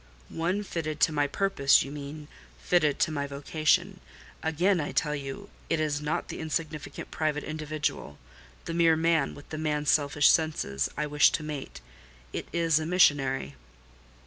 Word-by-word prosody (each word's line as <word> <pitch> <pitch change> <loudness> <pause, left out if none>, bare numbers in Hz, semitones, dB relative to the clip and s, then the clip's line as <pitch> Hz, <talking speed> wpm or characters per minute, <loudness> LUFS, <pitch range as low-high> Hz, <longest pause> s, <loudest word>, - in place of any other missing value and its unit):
"One 180 +5 -1
fitted 155 -5 -4
to - - +5
my 145 -1 +1
purpose, 145 -5 +3
you 135 - -8
mean—fitted 150 +1 -2
to - - +1
my 140 -2 -2
vocation. 145 +3 0 0.4
Again 175 +4 +1
I 145 - -4
tell 150 -1 +1
you 140 +8 -7 0.2
it 165 - +1
is 150 -2 -1
not 150 +1 -2
the - - -6
insignificant 155 -1 -4
private 150 -2 -1
individual—the 140 - -6
mere 165 -1 +4
man, 160 -3 +1
with 145 - -14
the 155 - -5
man's 150 -1 +1
selfish 145 -1 +4
senses—I 150 - -1
wish 150 -1 +5
to - - -1
mate: 150 -3 -6 0.5
it - - -4
is 165 -2 +2
the 160 0 -1
missionary." 140 - +2
150 Hz, 145 wpm, -28 LUFS, 145-160 Hz, 0.5 s, to